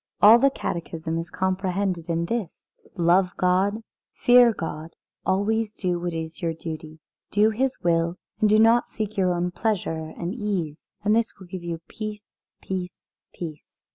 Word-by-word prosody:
All 220 Hz, +3 st, +9 dB
the 275 Hz, +2 st, +5 dB
Catechism 165 Hz, -7 st, -3 dB
is 165 Hz, -, -5 dB
comprehended 190 Hz, -2 st, -1 dB
in 170 Hz, 0 st, 0 dB
this: 225 Hz, -1 st, -4 dB, 0.2 s
Love 180 Hz, +1 st, +4 dB
God, 190 Hz, +4 st, +2 dB, 0.3 s
fear 245 Hz, -1 st, +6 dB
God, 165 Hz, -4 st, -6 dB, 0.3 s
always 210 Hz, +3 st, +1 dB
do 180 Hz, -3 st, -1 dB
what 175 Hz, -1 st, -3 dB
is 160 Hz, 0 st, -5 dB
your 165 Hz, -2 st, 0 dB
duty. 155 Hz, -1 st, -7 dB, 0.3 s
Do 210 Hz, +2 st, +4 dB
His 260 Hz, +4 st, 0 dB
will, 170 Hz, 0 st, +1 dB, 0.2 s
and 215 Hz, -1 st, +4 dB
do 215 Hz, -, +5 dB
not 225 Hz, +2 st, +5 dB
seek 215 Hz, -2 st, -3 dB
only 215 Hz, -, -20 dB
your 185 Hz, -2 st, +2 dB
own 175 Hz, +1 st, -1 dB
pleasure 175 Hz, -7 st, -2 dB
and 175 Hz, +2 st, -3 dB
ease. 190 Hz, -, -3 dB
And 210 Hz, +1 st, +3 dB
this 230 Hz, 0 st, 0 dB
will 190 Hz, -, -12 dB
give 180 Hz, 0 st, -7 dB
you 170 Hz, -1 st, -5 dB
peace 215 Hz, -1 st, -6 dB, 0.4 s
peace 185 Hz, -1 st, -4 dB, 0.3 s
peace." 155 Hz, -4 st, -9 dB
185 Hz, 165 wpm, -25 LUFS, 170-215 Hz, 0.4 s, All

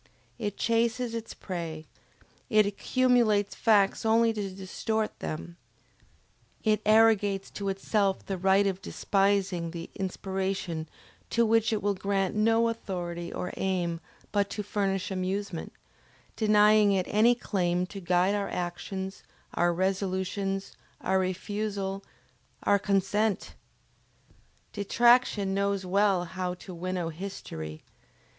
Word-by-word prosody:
It 205 Hz, -3 st, -3 dB
chases 230 Hz, +1 st, +1 dB
its 230 Hz, -1 st, -5 dB
prey, 165 Hz, -4 st, -5 dB, 0.6 s
it 215 Hz, -2 st, +5 dB
accumulates 215 Hz, -1 st, +2 dB
facts 205 Hz, -3 st, +3 dB
only 225 Hz, +1 st, +4 dB
to 205 Hz, -3 st, -3 dB
distort 210 Hz, +3 st, -3 dB
them, 170 Hz, +2 st, -6 dB, 1.1 s
it 215 Hz, -2 st, +2 dB
arrogates 215 Hz, -3 st, +4 dB
to 200 Hz, -1 st, -3 dB
itself 195 Hz, 0 st, 0 dB
the 195 Hz, -2 st, -3 dB
right 195 Hz, +2 st, +4 dB
of 195 Hz, -1 st, -1 dB
despising 195 Hz, -5 st, 0 dB
the 165 Hz, 0 st, -7 dB
inspiration 190 Hz, -4 st, -3 dB, 0.4 s
to 235 Hz, 0 st, +3 dB
which 225 Hz, 0 st, +3 dB
it 215 Hz, -3 st, -1 dB
will 205 Hz, 0 st, +2 dB
grant 195 Hz, 0 st, -1 dB
no 225 Hz, +2 st, +3 dB
authority 175 Hz, -6 st, -4 dB
or 180 Hz, -, -4 dB
aim 175 Hz, -3 st, -1 dB, 0.3 s
but 200 Hz, -1 st, +1 dB
to 210 Hz, -, -4 dB
furnish 195 Hz, -2 st, -1 dB
amusement, 190 Hz, -1 st, -3 dB, 0.6 s
denying 210 Hz, -1 st, +5 dB
it 185 Hz, -2 st, +1 dB
any 230 Hz, +3 st, +4 dB
claim 180 Hz, -6 st, 0 dB
to 195 Hz, +2 st, -8 dB
guide 180 Hz, +2 st, +2 dB
our 205 Hz, -1 st, -1 dB
actions, 190 Hz, +2 st, -4 dB, 0.3 s
our 175 Hz, 0 st, +2 dB
resolutions, 190 Hz, +1 st, -1 dB, 0.3 s
our 190 Hz, -, +2 dB
refusal, 195 Hz, +1 st, -3 dB, 0.6 s
our 200 Hz, 0 st, +4 dB
consent! 200 Hz, +2 st, 0 dB, 1.2 s
Detraction 220 Hz, -1 st, +3 dB
knows 200 Hz, -1 st, 0 dB
well 195 Hz, -1 st, +2 dB
how 180 Hz, 0 st, -3 dB
to 180 Hz, +1 st, -10 dB
winnow 175 Hz, -1 st, -3 dB
history! 80 Hz, -, -7 dB
195 Hz, 115 wpm, -28 LUFS, 185-210 Hz, 1.2 s, it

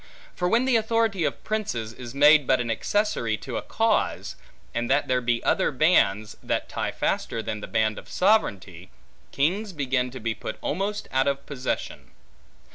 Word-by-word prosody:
For 180 Hz, -, 0 dB
when 235 Hz, +5 st, +3 dB
the 260 Hz, -3 st, +4 dB
authority 220 Hz, -5 st, +1 dB
of -, -, -3 dB
princes, 125 Hz, -, -3 dB
is 125 Hz, 0 st, -9 dB
made 150 Hz, 0 st, +6 dB
but 130 Hz, -, +3 dB
an 120 Hz, -1 st, -1 dB
accessory 115 Hz, -, 0 dB
to -, -, -7 dB
a -, -, -2 dB
cause, -, -, 0 dB, 0.4 s
and 120 Hz, 0 st, -2 dB
that 140 Hz, +2 st, +2 dB
there 130 Hz, -1 st, +1 dB
be 120 Hz, -1 st, 0 dB
other -, -, +2 dB
bands, 110 Hz, -, +2 dB
that -, -, -2 dB
tie -, -, -3 dB
faster 115 Hz, -, -2 dB
than 105 Hz, -1 st, -4 dB
the -, -, -6 dB
band 110 Hz, -1 st, 0 dB
of -, -, -15 dB
sovereignty, 100 Hz, -, +1 dB, 0.4 s
kings 190 Hz, +8 st, 0 dB
begin 130 Hz, -4 st, 0 dB
to 130 Hz, +1 st, -8 dB
be 115 Hz, 0 st, -2 dB
put 110 Hz, -, -6 dB
almost 200 Hz, +6 st, -2 dB
out 130 Hz, +1 st, +2 dB
of 140 Hz, 0 st, -1 dB
possession. 130 Hz, -3 st, -4 dB
135 Hz, 175 wpm, -25 LUFS, 115-185 Hz, 0.4 s, made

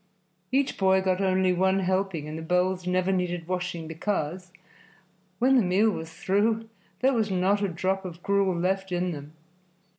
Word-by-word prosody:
Each 270 Hz, +1 st, 0 dB
boy 190 Hz, -1 st, +4 dB
got 190 Hz, 0 st, 0 dB
only 185 Hz, -1 st, +2 dB
one 190 Hz, +2 st, +2 dB
helping, 185 Hz, -4 st, -1 dB
and 155 Hz, -, -6 dB
the 160 Hz, -, -5 dB
bowls 180 Hz, +2 st, 0 dB
never 185 Hz, +1 st, +1 dB
needed 175 Hz, -3 st, -2 dB
washing, 180 Hz, -3 st, -3 dB
because, 180 Hz, +1 st, -3 dB, 0.9 s
when 260 Hz, +5 st, +4 dB
the -, -, +5 dB
meal 200 Hz, +3 st, +3 dB
was 160 Hz, -3 st, -6 dB
through, 220 Hz, +6 st, 0 dB, 0.3 s
there 265 Hz, +1 st, +4 dB
was 220 Hz, -3 st, +1 dB
not 190 Hz, +2 st, +1 dB
a 200 Hz, -, +1 dB
drop 190 Hz, +2 st, -1 dB
of 175 Hz, -2 st, -8 dB
gruel 200 Hz, -2 st, +2 dB
left 190 Hz, +2 st, -1 dB
in 180 Hz, 0 st, 0 dB
them. 145 Hz, -1 st, -8 dB
185 Hz, 170 wpm, -26 LUFS, 180-195 Hz, 0.9 s, the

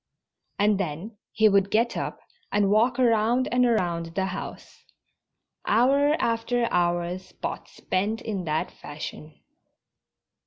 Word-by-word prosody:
And 205 Hz, -1 st, +3 dB
then 185 Hz, +5 st, -4 dB, 0.2 s
he 220 Hz, 0 st, +4 dB
would 200 Hz, -1 st, +3 dB
get 230 Hz, +3 st, +1 dB
up -, -, -4 dB, 0.3 s
and 200 Hz, -1 st, +2 dB
walk 235 Hz, +4 st, +3 dB
around 235 Hz, 0 st, +3 dB
and 250 Hz, +1 st, +3 dB
around 170 Hz, -7 st, -1 dB
the 190 Hz, 0 st, +1 dB
house. 190 Hz, 0 st, -7 dB, 0.8 s
Hour 275 Hz, +7 st, +4 dB
after 235 Hz, +1 st, 0 dB
hour 175 Hz, 0 st, +1 dB
Spot 185 Hz, -, -7 dB
spent 205 Hz, +4 st, -2 dB
in 200 Hz, -5 st, -4 dB
that 155 Hz, 0 st, -1 dB
fashion. 150 Hz, +1 st, -9 dB
205 Hz, 120 wpm, -26 LUFS, 180-230 Hz, 0.8 s, he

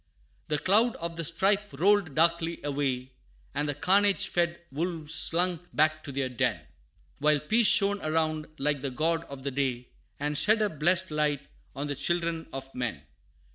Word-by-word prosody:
The 150 Hz, -, 0 dB
cloud 215 Hz, +9 st, +3 dB
of 170 Hz, 0 st, -5 dB
the 165 Hz, -, -3 dB
strife 195 Hz, +5 st, +1 dB
rolled 190 Hz, -3 st, +3 dB
darkly 170 Hz, +1 st, +2 dB
away 135 Hz, -3 st, -2 dB, 0.4 s
And 145 Hz, +1 st, -1 dB
the 145 Hz, -, -2 dB
carnage 200 Hz, +6 st, +2 dB
fed 170 Hz, -1 st, 0 dB
wolves 160 Hz, +1 st, -3 dB
slunk 175 Hz, +1 st, +1 dB
back 155 Hz, +1 st, +2 dB
to 140 Hz, -, -6 dB
their 135 Hz, -1 st, -1 dB
den 125 Hz, -2 st, 0 dB, 0.6 s
While 150 Hz, 0 st, +3 dB
Peace 220 Hz, +9 st, +3 dB
shone 200 Hz, +1 st, +4 dB
around 155 Hz, 0 st, 0 dB
like 145 Hz, -1 st, 0 dB
the 140 Hz, -, -2 dB
god 165 Hz, +5 st, 0 dB
of 140 Hz, -3 st, -10 dB
the 140 Hz, -, -2 dB
day, 130 Hz, -2 st, -2 dB, 0.3 s
And 150 Hz, +1 st, -1 dB
shed 215 Hz, +7 st, +3 dB
her 210 Hz, -, +2 dB
blest 175 Hz, +3 st, +1 dB
light 150 Hz, -2 st, 0 dB, 0.3 s
on 140 Hz, +1 st, -3 dB
the 145 Hz, -, -2 dB
children 165 Hz, +3 st, -1 dB
of 135 Hz, 0 st, -7 dB
men. 120 Hz, -, -3 dB
155 Hz, 170 wpm, -28 LUFS, 145-175 Hz, 0.6 s, shone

